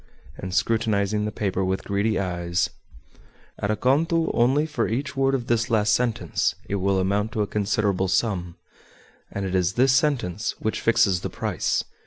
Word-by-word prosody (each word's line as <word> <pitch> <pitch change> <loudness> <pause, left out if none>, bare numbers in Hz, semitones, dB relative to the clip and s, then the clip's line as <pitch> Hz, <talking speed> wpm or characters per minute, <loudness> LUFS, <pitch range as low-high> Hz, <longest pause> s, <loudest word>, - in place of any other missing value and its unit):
And, 95 - -6
scrutinizing 105 -1 +1
the 105 - -2
paper 95 -2 -1
with 95 +1 -1
greedy 100 +2 0
eyes, 85 -2 -1 0.9
"At 100 - -2
a 110 - +2
conto 160 +8 +1
only 135 +6 +3
for 145 -7 -1
each 135 +6 -3
word 135 0 +2
of 125 -3 -3
this 115 -1 0
last 105 -2 +3
sentence 120 -3 0
it 100 - -2
will 95 0 +1
amount 100 +4 0
to 110 -3 +1
a - - 0
considerable 100 -2 0
sum, 95 -3 0 0.8
and 100 -1 -3
it 95 - -3
is 90 0 +1
this 130 +4 +4
sentence 125 - 0
which 110 - -2
fixes 100 -6 +3
the - - -3
price. - - -1
105 Hz, 170 wpm, -24 LUFS, 95-120 Hz, 0.9 s, this